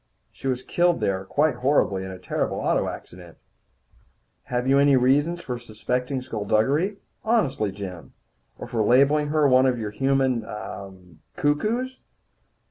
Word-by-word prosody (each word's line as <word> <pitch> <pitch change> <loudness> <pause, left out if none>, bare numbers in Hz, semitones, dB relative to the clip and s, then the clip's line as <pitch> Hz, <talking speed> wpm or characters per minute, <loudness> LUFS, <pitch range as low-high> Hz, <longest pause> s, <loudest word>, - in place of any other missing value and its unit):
She - - -7
was 130 -1 -1
killed 175 -1 +1
there 95 -1 -1
quite 145 +4 +1
horribly, 120 -8 +1
in 95 - -6
a 95 - -7
terrible 90 - -2
auto - - 0
accident." 90 -1 -11 1.1
"Have 125 +1 -2
you 135 +1 +4
any 140 -1 +5
reason 145 +7 +2
for 125 -8 -5
suspecting 125 +3 -3
skulduggery? 130 - 0 0.3
Honestly, 140 - +1
Jim? 95 -4 -8 0.4
Or - - -7
for 120 -2 -2
labelling 140 +7 +4
her 150 -1 +3
one 130 0 +5
of 125 -1 +1
your 110 -2 -4
human 135 0 +1
er 100 -2 -7 0.4
cuckoos?" 215 - -1
130 Hz, 140 wpm, -24 LUFS, 110-145 Hz, 1.1 s, any